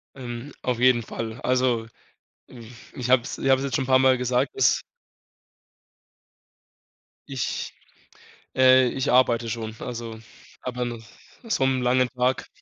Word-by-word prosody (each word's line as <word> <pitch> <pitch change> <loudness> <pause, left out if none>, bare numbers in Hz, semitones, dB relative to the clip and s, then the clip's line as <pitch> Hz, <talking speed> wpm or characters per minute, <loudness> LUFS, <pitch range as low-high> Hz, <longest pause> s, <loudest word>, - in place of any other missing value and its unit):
Ähm, 125 +1 -7
auf 125 -2 -2
jeden 125 -2 +4
Fall. 115 +1 -6
Also, 125 -3 +1 0.6
hm, 115 -3 -12 0.2
ich 125 -1 -5
habe 130 -1 +5
es - - -6
ich 135 - -1
habe 130 - +5
es 135 - -3
jetzt 135 - -2
schon 135 - 0
n' - - -7
paar 130 -1 +5
Mal 130 -1 +4
gesagt, 125 0 0
dass - - +3 2.5
ich 135 -4 -3 0.8
äh, 130 -1 +6
ich 130 +1 -2
arbeite 120 -2 +3
schon, 110 -1 -5
also 115 -2 -6 0.4
aber 125 -1 -3
nach 120 -2 -6 0.5
so 135 -10 +2
'nem 130 -1 0
langen 125 +1 +2
Tag. 125 +1 0
125 Hz, 150 wpm, -24 LUFS, 120-130 Hz, 2.5 s, äh